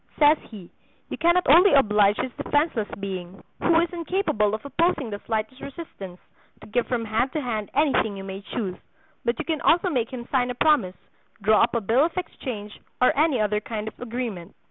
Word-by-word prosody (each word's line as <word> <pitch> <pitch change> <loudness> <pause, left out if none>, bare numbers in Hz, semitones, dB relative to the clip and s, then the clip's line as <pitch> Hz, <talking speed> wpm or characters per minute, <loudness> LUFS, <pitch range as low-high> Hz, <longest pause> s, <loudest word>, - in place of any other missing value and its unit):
Says 300 0 +5
he: 195 -6 -11 0.4
"You - - -5
cannot 345 +2 +3
only 350 +7 +7
oblige 210 -5 +4
this 260 - -2
defenseless 290 -8 0
being, 190 -1 -6 0.2
who 335 -1 +4
is 340 0 -2
incapable 335 - 0
of 220 - -9
opposing 280 -3 0
the 205 - -5
slightest 220 +3 -3
resistance, 200 - -9 0.4
to - - -11
give 240 +3 -1
from 235 -2 -1
hand 225 +4 0
to 310 - -1
hand 220 -5 -3
anything 270 -8 +2
you 195 - -7
may 195 0 -7
choose, 195 -3 -4 0.5
but 235 0 0
you - - -4
can 315 -3 -2
also 355 +2 +3
make 240 -6 0
him 245 -2 -7
sign 250 -2 +2
a 250 - -3
promise, 245 -10 +2 0.5
draw 215 +1 +5
up 230 - +2
a 235 - +1
bill 230 +7 +3
of 335 +3 -2
exchange, 220 - -6 0.2
or 250 - +4
any 300 -4 +2
other 210 0 +1
kind 215 0 -5
of - - -5
agreement. 230 -7 -5
235 Hz, 195 wpm, -24 LUFS, 210-295 Hz, 0.5 s, only